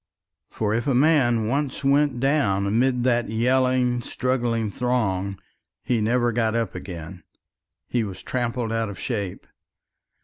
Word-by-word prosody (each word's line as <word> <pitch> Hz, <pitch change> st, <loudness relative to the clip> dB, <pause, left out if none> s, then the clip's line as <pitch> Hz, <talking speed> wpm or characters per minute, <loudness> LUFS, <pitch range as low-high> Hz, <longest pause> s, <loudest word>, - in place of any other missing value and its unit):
For 105 Hz, -1 st, -1 dB
if 120 Hz, +5 st, -1 dB
a 135 Hz, -, +2 dB
man 125 Hz, -6 st, +3 dB
once 140 Hz, +4 st, -1 dB
went 140 Hz, -2 st, +2 dB
down 120 Hz, -8 st, +2 dB
amid 125 Hz, +4 st, +1 dB
that 120 Hz, -1 st, +1 dB
yelling, 125 Hz, +1 st, +2 dB
struggling 120 Hz, -4 st, -1 dB
throng, 100 Hz, -6 st, -1 dB, 0.5 s
he 120 Hz, -3 st, 0 dB
never 120 Hz, +2 st, +2 dB
got 115 Hz, -1 st, 0 dB
up 115 Hz, -1 st, -1 dB
again 85 Hz, 0 st, -8 dB, 0.7 s
he 120 Hz, -2 st, 0 dB
was 95 Hz, -3 st, -7 dB
trampled 120 Hz, -2 st, -2 dB
out 115 Hz, -1 st, -1 dB
of 100 Hz, -, -8 dB
shape. 100 Hz, -7 st, -4 dB
120 Hz, 135 wpm, -24 LUFS, 110-130 Hz, 0.7 s, man